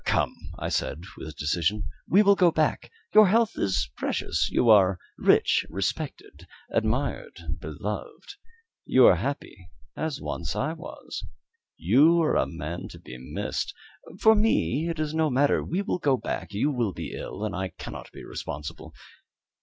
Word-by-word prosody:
"Come," - - +1 0.2
I - - -3
said, 80 - -2
with 80 -1 -8
decision, 85 +7 0 0.2
"we 200 +4 +5
will 200 0 +6
go 185 -3 +5
back; 155 -1 0 0.2
your 215 -1 +8
health 225 +3 +3
is 80 -11 0
precious. - - -1
You 120 - +1
are 100 -4 +6 0.2
rich, - - +4
respected, 155 - -4 0.2
admired, - - -1 0.2
beloved; - - -6 0.5
you 130 -1 +5
are 90 - +7
happy, 95 -6 -5 0.3
as 155 -3 -3
once 85 -1 -4
I 155 +3 -1
was. 170 +1 -8 0.5
You 165 +5 +5
are 155 - +2
a - - +2
man 85 +1 -6
to - - -11
be 65 - -10
missed. 65 - -4 0.4
For 220 - +7
me 170 - +2
it 165 -2 -4
is 155 -1 -1
no 160 -1 +2
matter. 140 +2 +2
We 185 +5 -2
will 180 - -2
go 140 -5 +2
back; - - -4
you 110 +9 +1
will 120 -7 -1
be - - -6
ill, 105 - -5
and 105 - -3
I 95 0 -2
cannot - - -9
be - - -11
responsible. 80 +2 -7
135 Hz, 160 wpm, -26 LUFS, -, 0.5 s, your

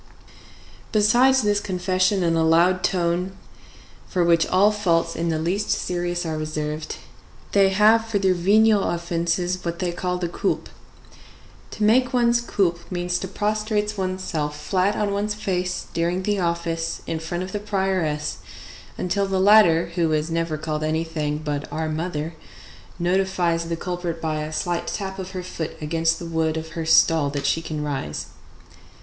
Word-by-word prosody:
Besides 240 +5 +4
this 205 -1 +2
confession 185 0 0
in 165 -1 +2
a 165 - +2
loud 170 +3 +3
tone, 180 +1 0 0.7
for 180 - 0
which 170 -1 +3
all 200 +3 +4
faults 180 -6 +1
in 170 +1 -1
the 160 - 0
least 185 +6 -1
serious 175 0 -1
are 160 -1 -2
reserved, 155 0 -4 0.6
they 195 -1 +5
have 215 +3 +4
for 225 -2 0
their 190 -2 +3
venial 205 +4 +4
offences 170 +1 -1
what 170 0 -3
they 180 0 -1
call 180 +1 -2
the 180 -1 -2
coulpe. 170 - -2 1.0
To 215 - -4
make 250 +5 +3
one's 235 -1 +3
coulpe 180 -7 -1
means 175 0 -1
to 190 - -4
prostrate 210 +1 -1
one's 185 -1 -3
self 150 -4 -3
flat 185 +6 +1
on 205 -1 0
one's 210 +1 -1
face 180 -3 -2
during 175 +2 0
the 205 0 0
office 170 -1 -2
in 165 - -3
front 175 +3 -4
of 185 - -7
the 210 - -2
prioress 190 -7 -1 0.6
until 195 +2 0
the 190 -1 0
latter, 185 -5 +5
who 170 -2 +1
is 155 +2 -1
never 165 -1 -1
called 155 0 -3
anything 155 -1 -1
but 150 -2 -4
our 160 +2 -2
mother, 155 0 -3 0.6
notifies 175 -2 +1
the 165 - -2
culprit 175 -1 -4
by 155 -1 -2
a 155 +1 -5
slight 170 +2 -2
tap 195 -1 -4
of 185 -1 -5
her 185 -1 -4
foot 170 -3 -5
against 165 +1 0
the 170 - -7
wood 160 -1 0
of 160 0 -5
her 160 0 -5
stall 160 -2 +5
that 140 0 -3
she 165 - +1
can 155 -2 -4
rise. 135 - -3
175 Hz, 165 wpm, -23 LUFS, 160-195 Hz, 1.0 s, they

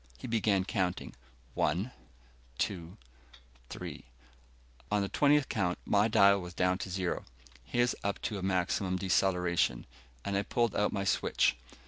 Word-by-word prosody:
He - - -9
began 105 -5 +1
counting, 95 -2 -2 0.4
"One, 90 +11 0 0.7
two, 85 +2 -3 0.7
three - - -7 0.4
..." - - -29
On 105 -1 +2
the 100 - -3
twentieth 145 -1 +3
count, 90 -2 0
my 105 +1 +3
dial 100 -2 +5
was 90 -1 -8
down 90 +1 +1
to 95 - -5
zero, 90 -1 -2 0.4
his 120 - +1
up 100 0 -1
to 105 -3 -2
maximum 95 0 0
deceleration, 90 -7 +1 0.4
and 100 - -1
I 100 - +2
pulled 120 +1 0
out 105 - +2
my 100 -2 -2
switch. 100 - +2
95 Hz, 140 wpm, -31 LUFS, 90-105 Hz, 0.7 s, dial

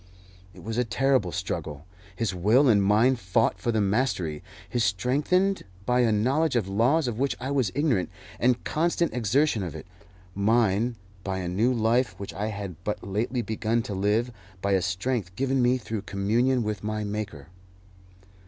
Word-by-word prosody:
It - - -14
was 115 +2 -3
a - - +3
terrible 125 -4 +1
struggle. 75 -1 -4 0.3
His 105 0 -1
will 110 +10 +4
and 105 -5 +5
mine 110 +6 +4
fought 105 +2 +1
for 120 - 0
the 110 -2 +1
mastery 95 - 0 0.3
his 120 +4 0
strengthened 145 - +1 0.2
by 125 +2 +2
a 120 -3 +3
knowledge 130 +8 +1
of 110 -6 +1
laws 125 +10 +2
of 115 -1 -3
which 140 +1 0
I 130 +3 -4
was 130 -9 +1
ignorant, 140 - +1 0.3
and 125 0 +2
constant 170 +1 0
exertion 125 +2 +1
of 85 -6 -5
it; - - -8 0.5
mine, 110 +2 +2 0.3
by 95 -1 -2
a 90 -2 -3
new 105 +8 +1
life 120 +1 +1
which 100 - -6
I 105 +2 -3
had 100 -5 -6
but 105 - -3
lately 115 +5 -1
begun 110 +2 -1
to 105 - -5
live, 105 +5 +1 0.3
by 100 +2 -1
a 95 -1 +3
strength 95 +1 -2
given 135 +2 +1
me 125 +1 +3
through 110 -3 -5
communion 115 +6 +1
with 105 -2 -3
my 105 0 -2
Maker. 100 -9 -5
110 Hz, 170 wpm, -26 LUFS, 100-125 Hz, 0.5 s, and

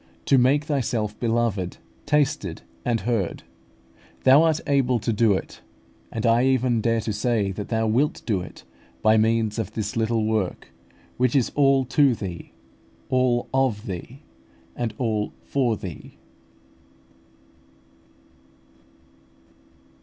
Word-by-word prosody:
to 135 - +4
make 135 +4 +3
Thyself 120 -7 -2
beloved, 115 -6 -1 0.3
tasted, 145 - 0 0.2
and 115 -2 0
heard. 105 -5 -2 0.8
Thou 135 +3 +7
art 160 -1 +2
able 135 -4 +2
to 115 +1 -1
do 110 -1 +3
it; 95 - -5 0.5
and 110 - -3
I 115 +1 +4
even 130 -3 +2
dare 115 0 +1
to 110 0 -3
say 105 -2 0
that 100 +2 -6
Thou 115 -1 0
wilt 125 +7 0
do 100 -6 0
it, - - -11 0.4
by 110 - +5
means 110 0 +1
of 110 - -4
this 105 -2 -3
little 115 -1 0
work, 110 -4 -2 0.5
which 125 0 +1
is 130 -4 +2
all 135 -2 +3
to 135 0 +3
Thee, 90 -6 -7 0.6
all 125 -2 +1
of 130 -5 +1
Thee, 115 - -7 0.5
and 120 -2 -2
all 110 -4 -1
for 125 -6 0
Thee. 90 -6 -9
115 Hz, 125 wpm, -24 LUFS, 110-130 Hz, 0.8 s, Thou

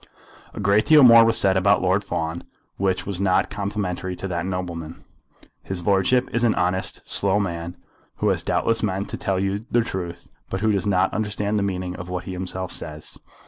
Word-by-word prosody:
A - - -6
great 100 +1 +2
deal 155 -2 +7
more 115 -2 +9
was 115 0 +2
said 95 -1 +3
about 95 +1 +3
Lord 95 +3 +2
Fawn, 85 -3 -3 0.4
which 95 -1 0
was 95 -2 -3
not 95 -2 +2
complimentary 100 -3 -3
to 95 - -5
that 85 0 -2
nobleman. 85 -3 -5 0.6
"His 90 -3 -6
lordship 100 +6 +3
is 120 - 0
an 115 - +3
honest, 95 +1 -1
slow 100 +1 +2
man, 85 -3 -4 0.4
who - - 0
has - - +1
doubtless 115 0 +1
meant 100 -1 -2
to - - -4
tell 95 -2 -1
you 100 +4 -2
the 120 - +3
truth, 85 -6 -5 0.2
but 95 - -3
who 110 0 +2
does 100 0 -1
not 95 -1 +2
understand 105 -1 -1
the 100 0 0
meaning 90 -1 -4
of 90 0 -8
what 90 -1 -3
he 95 - -7
himself 95 0 -4
says. 75 -1 -6
95 Hz, 195 wpm, -23 LUFS, 90-105 Hz, 0.6 s, more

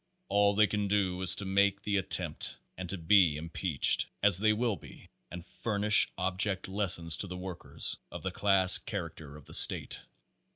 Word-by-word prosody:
All 100 0 +1
they 105 +1 +3
can 105 0 -4
do 95 -2 -2
is 95 - +6
to 100 - -6
make 100 +1 0
the 100 -1 -2
attempt, 90 -4 -4 0.2
and 90 -1 -9
to 100 - -5
be 85 -2 +2
impeached 80 0 -2 0.2
as 90 - +4
they 110 +1 +1
will 115 0 -2
be - - -17 0.2
and 85 -1 -11
furnish 105 0 +2
object 95 +1 -3
lessons 90 -5 +1
to 100 - -5
the 90 0 -9
workers, 90 -1 -2
of - - -10
the - - -5
class 95 -2 +4
character 85 -8 -9
of 75 - -18
the - - -12
state. - - +5
95 Hz, 175 wpm, -28 LUFS, 90-100 Hz, 0.2 s, is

